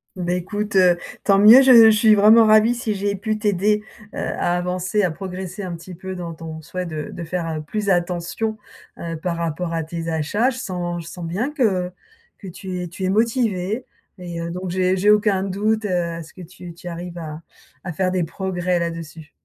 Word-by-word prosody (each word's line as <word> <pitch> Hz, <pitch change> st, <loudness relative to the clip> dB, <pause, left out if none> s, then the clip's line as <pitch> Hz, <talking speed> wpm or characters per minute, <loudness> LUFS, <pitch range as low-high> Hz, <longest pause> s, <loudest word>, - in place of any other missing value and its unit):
Bah, 180 Hz, -1 st, -2 dB
écoute, 205 Hz, +4 st, -4 dB
heu, 180 Hz, -2 st, +5 dB, 0.2 s
tant 195 Hz, -1 st, +4 dB
mieux 225 Hz, +6 st, +9 dB
je 260 Hz, -1 st, +7 dB
je 225 Hz, -2 st, +9 dB
suis 215 Hz, 0 st, +5 dB
vraiment 215 Hz, +2 st, +7 dB
ravie 215 Hz, +2 st, +5 dB
si 230 Hz, -3 st, -2 dB
j'ai 200 Hz, 0 st, -1 dB
pu 215 Hz, +2 st, -2 dB
t'aider, 210 Hz, 0 st, +1 dB, 0.3 s
heu, -, -, -8 dB
à 175 Hz, -, -1 dB
avancer 180 Hz, +3 st, -1 dB
à 185 Hz, -, +2 dB
progresser 185 Hz, +3 st, -6 dB
un 180 Hz, -2 st, -4 dB
petit 175 Hz, +2 st, -10 dB
peu 190 Hz, +2 st, -7 dB
dans 170 Hz, -2 st, -6 dB
ton 160 Hz, -1 st, -8 dB
souhait 180 Hz, +3 st, -5 dB
de 155 Hz, -3 st, -5 dB
de -, -, -7 dB
faire, 165 Hz, 0 st, -3 dB
heu, 155 Hz, -1 st, -3 dB
plus 205 Hz, +7 st, -3 dB
attention, 180 Hz, +4 st, -1 dB, 0.4 s
heu, 165 Hz, -1 st, -5 dB
par 170 Hz, +1 st, -3 dB
rapport 170 Hz, +1 st, -3 dB
à 165 Hz, -, 0 dB
tes 165 Hz, +1 st, -5 dB
achats. 165 Hz, -, +1 dB
Je 260 Hz, -, -7 dB
sens 175 Hz, -5 st, -4 dB
je -, -, -12 dB
sens 175 Hz, -2 st, -7 dB
bien 200 Hz, -, -2 dB
que 200 Hz, -, +1 dB, 0.5 s
que 195 Hz, -, -11 dB
tu 185 Hz, 0 st, -6 dB
es 180 Hz, -, -4 dB
tu 185 Hz, +3 st, -5 dB
es -, -, +1 dB
motivée 220 Hz, 0 st, 0 dB, 0.3 s
et 175 Hz, -2 st, -6 dB
heu, 170 Hz, 0 st, -4 dB
donc 180 Hz, +1 st, -5 dB
j'ai 185 Hz, +1 st, +1 dB
j'ai 200 Hz, +3 st, +2 dB
aucun 210 Hz, -2 st, +4 dB
doute, 210 Hz, +3 st, 0 dB
heu, -, -, -2 dB
à 170 Hz, -2 st, -1 dB
ce 160 Hz, -, -12 dB
que 185 Hz, -, -11 dB
tu 175 Hz, 0 st, -11 dB
tu 175 Hz, -, -11 dB
arrives 175 Hz, +1 st, -6 dB
à 155 Hz, -1 st, -7 dB, 0.4 s
à 180 Hz, -, -4 dB
faire 185 Hz, +2 st, 0 dB
des 185 Hz, -2 st, 0 dB
progrès 180 Hz, +1 st, -2 dB
là-dessus. 165 Hz, -2 st, -5 dB
180 Hz, 215 wpm, -21 LUFS, 170-205 Hz, 0.5 s, mieux